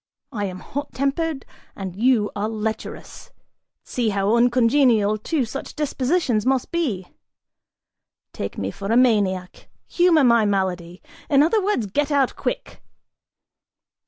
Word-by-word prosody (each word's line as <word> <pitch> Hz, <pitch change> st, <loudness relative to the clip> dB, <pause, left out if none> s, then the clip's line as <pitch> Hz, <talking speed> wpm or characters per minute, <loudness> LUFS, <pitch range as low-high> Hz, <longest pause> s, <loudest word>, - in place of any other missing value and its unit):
I 205 Hz, -3 st, -3 dB
am 185 Hz, -1 st, -6 dB
hot 285 Hz, +2 st, -6 dB
tempered 280 Hz, +2 st, -1 dB, 0.3 s
and 190 Hz, -3 st, -6 dB
you 225 Hz, -1 st, +2 dB
are 205 Hz, +1 st, -2 dB
lecherous; 220 Hz, 0 st, -5 dB, 0.5 s
see 240 Hz, -3 st, -1 dB
how 200 Hz, +2 st, +1 dB
uncongenial 235 Hz, -3 st, +3 dB
two 285 Hz, +3 st, -1 dB
such 270 Hz, +5 st, -7 dB
dispositions 275 Hz, -, 0 dB
must 260 Hz, 0 st, 0 dB
be! 245 Hz, -, -2 dB, 1.2 s
Take 100 Hz, -, -5 dB
me 95 Hz, 0 st, -3 dB
for 200 Hz, -, -5 dB
a 230 Hz, -, +4 dB
maniac, 200 Hz, -7 st, +1 dB, 0.2 s
humor 345 Hz, -4 st, +3 dB
my 235 Hz, -3 st, +5 dB
malady: 185 Hz, -3 st, -2 dB, 0.3 s
in 285 Hz, -1 st, +5 dB
other 405 Hz, +6 st, +2 dB
words, 390 Hz, -, 0 dB
get 285 Hz, +9 st, -1 dB
out 280 Hz, -3 st, +1 dB
quick!" -, -, -4 dB
235 Hz, 130 wpm, -22 LUFS, 205-280 Hz, 1.2 s, my